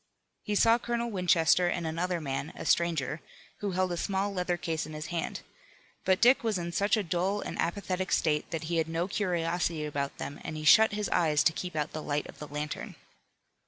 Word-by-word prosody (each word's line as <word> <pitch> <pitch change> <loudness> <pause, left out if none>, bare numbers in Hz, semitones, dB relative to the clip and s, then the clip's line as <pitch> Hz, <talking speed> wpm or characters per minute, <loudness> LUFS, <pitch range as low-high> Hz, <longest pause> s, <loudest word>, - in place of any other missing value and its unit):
He 210 - -2
saw 230 +3 +5
Colonel 235 0 -2
Winchester 180 -2 +3
and 175 -1 -1
another 170 +2 -1
man, 140 -1 -4
a - - -7
stranger, 165 -3 +1 0.4
who 200 -2 -2
held 185 0 +1
a 175 - -2
small 195 +2 -1
leather 180 -1 -1
case 160 -3 -3
in 155 - -9
his 155 0 -5
hand. 170 - -3 0.6
But 190 0 +3
Dick 245 +2 +5
was 220 -4 +1
in 170 -1 -4
such 200 +5 +2
a 215 - 0
dull 185 +4 0
and - - -5
apathetic 185 0 -2
state 150 -2 +1
that 165 -1 -3
he 170 +1 -1
had 160 0 0
no 165 +2 -1
curiosity 175 -4 -1
about 140 -2 -3
them 145 - -6
and 155 - -5
he 155 - -5
shut 220 +8 +7
his 210 0 -1
eyes 155 -4 +3
to 165 - +4
keep 180 0 -5
out 150 -1 -1
the 155 - -5
light 145 0 -1
of - - -12
the 150 - -7
lantern. 150 +1 -5
175 Hz, 210 wpm, -29 LUFS, 155-190 Hz, 0.6 s, shut